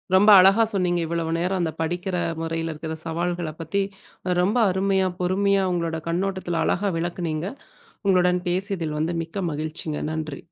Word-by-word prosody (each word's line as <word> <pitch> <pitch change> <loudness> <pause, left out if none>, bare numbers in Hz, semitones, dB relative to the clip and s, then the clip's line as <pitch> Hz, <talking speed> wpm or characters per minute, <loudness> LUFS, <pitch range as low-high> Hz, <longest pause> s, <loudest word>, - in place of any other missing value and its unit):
ரொம்ப 205 +3 +6
அழகா 195 +5 +6
சொன்னீங்க, 180 -2 +1
இவ்வளவு 165 0 -2
நேரம் 185 +2 0
அந்த 160 -2 0
படிக்கிற 175 +3 -2 0.3
முறைல 165 0 -2
இருக்கிற 160 +1 -5
சவால்களப் 170 -1 -3
பத்தி 165 +5 -1 0.6
ரொம்ப 205 +7 +1
அருமையா, 190 0 +1
பொறுமையா 195 +2 +2
உங்களோட 165 -2 -1
கண்ணோட்டத்தில 175 -1 -1
அழகா 200 +2 +1
விளக்குனீங்க. 170 0 -2 0.6
உங்களுடன் 180 -1 +3
பேசியதில் 180 -4 -1
வந்து 165 +3 -1
மிக்க 170 +4 -5
மகிழ்ச்சிங்க. 155 0 -4
நன்றி! 155 -3 -5
175 Hz, 135 wpm, -24 LUFS, 165-190 Hz, 0.6 s, ரொம்ப